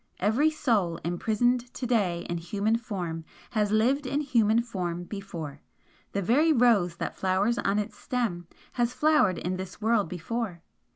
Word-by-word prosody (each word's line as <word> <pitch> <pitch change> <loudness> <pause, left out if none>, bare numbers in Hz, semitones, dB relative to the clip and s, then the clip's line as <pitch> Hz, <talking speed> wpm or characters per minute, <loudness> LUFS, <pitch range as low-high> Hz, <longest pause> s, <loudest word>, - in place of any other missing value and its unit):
Every 230 +11 +3
soul 215 - +1
imprisoned 235 +8 0
to 255 - -4
day 195 -8 +1
in 170 -1 -2
human 205 +6 0
form 180 -8 -4 0.3
has 210 -3 +1
lived 255 +6 +2
in 285 +3 0
human 235 -5 +3
form 175 -6 -3
before, 175 -7 -7 0.5
the 200 - -1
very 290 - +4
rose 230 - +4
that - - -4
flowers 195 +5 +1
on 195 +1 +1
its 210 0 -3
stem 210 -9 -2 0.2
has 240 0 0
flowered 300 - +3
in 185 +1 -2
this 190 0 -7
world 220 -4 +2
before. 180 0 -4
210 Hz, 155 wpm, -27 LUFS, 180-240 Hz, 0.5 s, very